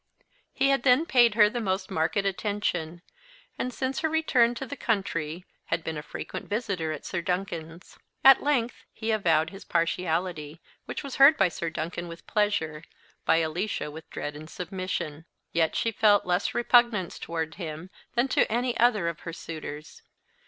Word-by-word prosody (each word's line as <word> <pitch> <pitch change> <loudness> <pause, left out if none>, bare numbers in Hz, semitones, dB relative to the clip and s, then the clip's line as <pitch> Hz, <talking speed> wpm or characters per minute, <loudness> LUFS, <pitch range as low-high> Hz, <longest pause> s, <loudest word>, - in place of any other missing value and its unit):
He 275 +1 +2
had 275 -2 +3
then 255 +5 +4
paid 240 -7 +4
her 210 -2 +7
the 235 +3 -3
most 190 -2 -2
marked 160 +1 0
attention; 195 -4 -2 0.6
and, 250 - -1
since 260 +3 -2
her 320 0 0
return 260 -7 +3
to 270 - -5
the 285 - -6
country, 180 - -2 0.2
had 165 -1 -2
been 160 - -3
a 150 - -4
frequent - - -7
visitor 200 -7 -2
at 155 - -6
Sir 185 - -2
Duncan's. 175 -2 -4 0.2
At 270 -1 +8
length 250 -5 0
he 220 0 -3
avowed 165 -6 +2
his 195 - -10
partiality, 165 -2 -1 0.3
which - - -5
was 280 -2 -6
heard 275 +3 +8
by 195 - +4
Sir 170 0 -4
Duncan 170 +2 -4
with 170 0 -10
pleasure, 185 -8 0 0.4
by 165 - +4
Alicia 160 -1 -3
with 160 +1 -11
dread 145 0 -5
and 155 +1 -10
submission. 175 -4 -4 0.3
Yet 165 -1 +1
she 230 - +1
felt 210 -1 +4
less 180 +1 0
repugnance 240 -6 +3
towards 160 -1 -4
him 165 0 -6 0.2
than 240 +2 +3
to - - +2
any 240 +1 0
other 220 -7 +3
of 170 -2 -3
her 165 - -7
suitors. 155 -2 -8
185 Hz, 170 wpm, -27 LUFS, 165-235 Hz, 0.6 s, At